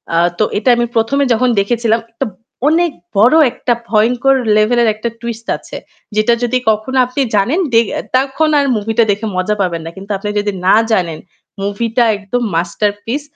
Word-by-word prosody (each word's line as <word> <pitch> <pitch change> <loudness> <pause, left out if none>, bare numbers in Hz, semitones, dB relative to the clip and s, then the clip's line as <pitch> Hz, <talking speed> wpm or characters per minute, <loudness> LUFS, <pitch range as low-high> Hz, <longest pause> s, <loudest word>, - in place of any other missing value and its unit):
আ - - +3 0.2
তো - - +4
এটা 225 - +1
আমি 240 0 +1
১ম 225 +5 +1
এ - - +1
যখন 250 +2 +1
দেখেছিলাম 230 +2 +1
একটা 230 +4 -3 0.4
অনেক 335 +2 +2 0.3
বড় 240 +9 +5 0.2
একটা 240 - -1 0.2
ভয়ংকর 240 +5 +2 0.2
লেভেল 215 +3 +3
এর 230 - +2
একটা 230 +2 -3
টুইস্ট 230 -1 -6
আছে। - - -10 0.4
যেটা 215 +2 +3
যদি 250 +1 +1
কখনো 220 +5 -1
আপনি 250 +3 -3
জানেন 240 - +1
দে 230 - +6 0.4
তখন 275 +4 0
আর 280 - +1
মুভিটা 225 +2 +1
দেখে 205 +2 -3
মজা 185 +3 0
পাবেন 170 -3 -1
না। - - -5
কিন্তু 195 +2 -8
আপনি 210 +2 -5
যদি 205 0 -1 0.2
না - - +6 0.2
জানেন 170 -7 0 0.4
মুভিটা 225 +4 0
একদম 205 +5 -3
মাস্টারপিস। 205 - -2
225 Hz, 175 wpm, -15 LUFS, 205-245 Hz, 0.4 s, দে